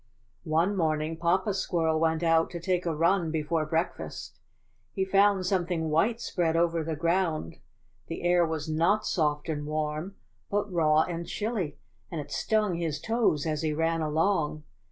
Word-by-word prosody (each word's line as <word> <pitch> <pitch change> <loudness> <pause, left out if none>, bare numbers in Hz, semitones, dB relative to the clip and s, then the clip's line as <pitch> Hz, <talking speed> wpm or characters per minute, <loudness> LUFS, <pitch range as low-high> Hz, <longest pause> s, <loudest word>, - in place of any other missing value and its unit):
^^One 165 +6 +2
morning 155 -2 0
Papa 180 +5 +1
Squirrel 165 -4 0
went 160 0 +1
out 165 -1 +3
to 175 - -6
take 180 0 -1
a 165 - 0
run 170 +2 +2
before 155 0 -1
breakfast. 165 +3 -3 0.5
He 190 -2 0
found 195 0 +3
some 180 -2 +1
thing 160 -3 -1
white 215 +10 +2
spread 170 -7 -1
over 165 -1 +2
the 160 0 -3
ground; 165 - 0 0.5
the - - -6
air 175 0 +4
was 160 -2 -2
not 170 +7 +2
soft 150 -4 0
and 150 -2 -2
warm 155 +4 -3 0.3
but 205 -1 -1
raw 155 -2 +4
and 170 -1 -5
chilly, 205 -9 -3 0.3
and 165 - -4
it 145 - -7
stung 215 -4 +1
his 160 -3 -2
toes 225 -10 +1
as 155 -2 -1
he 155 -1 0
ran 165 +1 0
along. 155 0 0
165 Hz, 165 wpm, -28 LUFS, 155-185 Hz, 0.5 s, air